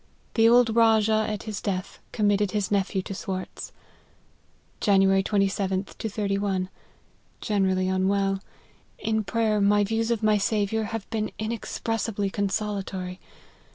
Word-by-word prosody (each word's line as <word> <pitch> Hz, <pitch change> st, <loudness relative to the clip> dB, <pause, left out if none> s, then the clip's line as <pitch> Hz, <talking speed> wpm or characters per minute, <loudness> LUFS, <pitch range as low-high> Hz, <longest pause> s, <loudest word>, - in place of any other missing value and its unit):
The 225 Hz, 0 st, +5 dB
old 235 Hz, -2 st, +5 dB
Rajah, 220 Hz, -1 st, +4 dB
at 210 Hz, -2 st, -4 dB
his 215 Hz, -2 st, -5 dB
death, 195 Hz, -1 st, -3 dB
committed 205 Hz, -2 st, +2 dB
his 205 Hz, -1 st, -2 dB
nephew 195 Hz, -1 st, 0 dB
to 195 Hz, -, -6 dB
Swartz." 185 Hz, -1 st, -5 dB, 1.1 s
"Jan. 195 Hz, -2 st, +4 dB
27th 195 Hz, 0 st, +1 dB
to 220 Hz, -, -2 dB
31. 200 Hz, -2 st, -1 dB, 0.7 s
Generally 190 Hz, -3 st, +1 dB
unwell. 195 Hz, +1 st, +1 dB, 0.6 s
In 220 Hz, 0 st, -1 dB
pray 225 Hz, +2 st, 0 dB
er, 210 Hz, -1 st, +2 dB
my 205 Hz, +1 st, +4 dB
views 225 Hz, +2 st, -1 dB
of 230 Hz, -2 st, 0 dB
my 215 Hz, -1 st, +4 dB
Saviour 215 Hz, +1 st, 0 dB
have 225 Hz, -1 st, -5 dB
been 215 Hz, -1 st, -1 dB
inexpressi 225 Hz, 0 st, -3 dB
bly 200 Hz, -1 st, 0 dB
consolatory. 195 Hz, -2 st, -3 dB
205 Hz, 130 wpm, -26 LUFS, 195-220 Hz, 1.1 s, The